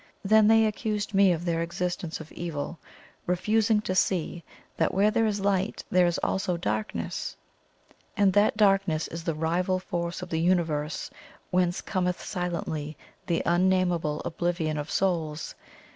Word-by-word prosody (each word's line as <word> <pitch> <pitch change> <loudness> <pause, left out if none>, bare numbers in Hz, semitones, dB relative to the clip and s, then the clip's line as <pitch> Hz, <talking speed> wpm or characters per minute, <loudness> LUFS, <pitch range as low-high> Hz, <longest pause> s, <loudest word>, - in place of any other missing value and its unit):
Then 215 +1 +6
they 225 0 +6
accused 210 -1 -2
me 195 -1 +5
of 170 0 -2
the 170 -1 0
existence 170 0 -3
of 160 -1 -10
evil, 165 -1 -5 0.5
refusing 210 +4 +2
to 185 - -2
see 175 -2 0 0.3
that 160 - 0
where 205 +2 +4
there 225 0 +2
is 205 -1 -1
light 195 0 0
there 180 -1 +5
is 170 - 0
also 190 -2 0
darkness, 105 - -3 0.8
and 200 -2 +4
that 205 +2 +3
darkness 195 -6 +3
is 165 0 -6
the 165 -2 -1
rival 175 +4 0
force 175 -1 -4
of 180 - -8
the 160 - -1
Universe, 165 -4 0 0.4
whence 180 -1 +1
cometh 180 -1 -1
silently 170 -4 -4 0.3
the 170 -2 0
Unnamable 175 -3 +1
Oblivion 170 -2 -1
of 150 +1 -5
Souls. 165 -5 -1
180 Hz, 145 wpm, -27 LUFS, 165-195 Hz, 0.8 s, Then